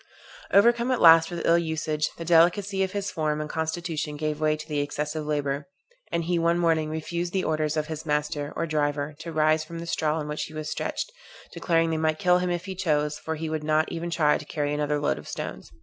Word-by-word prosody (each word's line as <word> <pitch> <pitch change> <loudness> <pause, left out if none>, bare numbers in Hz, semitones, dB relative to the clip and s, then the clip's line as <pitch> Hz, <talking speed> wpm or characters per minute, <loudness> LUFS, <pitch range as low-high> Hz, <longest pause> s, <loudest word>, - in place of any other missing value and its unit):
Overcome 235 +4 +4
at 255 -2 +1
last 165 -1 +8
with 175 -1 -4
ill 170 +1 +5
usage, 155 -2 -1
the 165 - -6
delicacy 180 +4 +3
of 190 0 0
his 200 0 -2
form 155 -1 -1
and 155 - -3
constitution 160 -1 -3
gave 155 0 -2
way 155 0 +2
to 155 - -9
the 150 -2 -1
excessive 150 +1 -3
labor, 145 -1 -1 0.4
and 170 - 0
he 175 +1 0
one 170 +1 +2
morning 165 -3 +2
refused 170 +3 -3
the 190 -1 +1
orders 155 0 0
of 155 - 0
his 155 -1 -6
master, 150 -1 -1
or 165 - -1
driver, 145 -1 -1
to 165 +1 -6
rise 155 0 +2
from 165 +1 -8
the 165 - -6
straw 155 -2 0
on 150 -2 -3
which 150 0 -3
he 155 - -11
was 155 0 -4
stretched, - - -3 0.4
declaring 165 -1 +1
they 160 - 0
might 155 0 +1
kill 180 +2 +3
him 180 0 -1
if 175 0 -2
they 190 - -4
chose, 150 -5 0
for 160 - -4
he 160 +1 -4
would 155 -1 -3
not 155 +1 +1
even 170 +1 -3
try 155 -3 +2
to 150 - -9
carry 145 -1 -2
another 150 0 0
load 145 - 0
of - - -12
stones. - - -6
155 Hz, 230 wpm, -26 LUFS, 150-170 Hz, 0.4 s, last